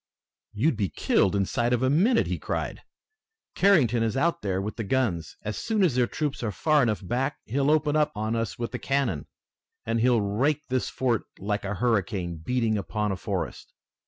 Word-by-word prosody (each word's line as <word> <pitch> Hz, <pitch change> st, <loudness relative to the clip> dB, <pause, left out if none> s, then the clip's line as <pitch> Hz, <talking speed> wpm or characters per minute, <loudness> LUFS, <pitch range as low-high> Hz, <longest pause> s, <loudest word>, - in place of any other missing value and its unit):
"You'd 115 Hz, +5 st, +1 dB
be 100 Hz, -4 st, 0 dB
killed 100 Hz, +1 st, +2 dB
inside 120 Hz, +5 st, +1 dB
of 125 Hz, +1 st, +1 dB
a 130 Hz, -, +3 dB
minute!" 220 Hz, -, +3 dB
he -, -, -3 dB
cried. -, -, -3 dB, 0.7 s
"Carrington 140 Hz, -, +4 dB
is 115 Hz, +3 st, 0 dB
out 165 Hz, +5 st, +1 dB
there 95 Hz, -2 st, -1 dB
with 105 Hz, +2 st, -4 dB
the 115 Hz, -, -2 dB
guns! 100 Hz, -, -1 dB
As 105 Hz, 0 st, -4 dB
soon 220 Hz, -3 st, +1 dB
as 170 Hz, -8 st, +3 dB
their 125 Hz, -1 st, +2 dB
troops 150 Hz, -2 st, -3 dB
are 110 Hz, -3 st, -1 dB
far 150 Hz, -, +2 dB
enough 110 Hz, -5 st, 0 dB
back 135 Hz, +5 st, -1 dB
he'll 135 Hz, +5 st, 0 dB
open 150 Hz, -1 st, +2 dB
on 115 Hz, -8 st, 0 dB
us 115 Hz, -1 st, -2 dB
with 120 Hz, -1 st, -3 dB
the -, -, -4 dB
cannon, 135 Hz, -, -1 dB, 0.6 s
and 115 Hz, +1 st, 0 dB
he'll 120 Hz, 0 st, +4 dB
rake 130 Hz, +10 st, 0 dB
this 130 Hz, 0 st, 0 dB
fort 120 Hz, -4 st, 0 dB
like 105 Hz, +1 st, -2 dB
a 100 Hz, +1 st, -2 dB
hurricane 95 Hz, -6 st, 0 dB
beating 110 Hz, +5 st, 0 dB
upon 105 Hz, +1 st, -2 dB
a -, -, -1 dB
forest. -, -, -4 dB
120 Hz, 190 wpm, -26 LUFS, 105-140 Hz, 0.7 s, Carrington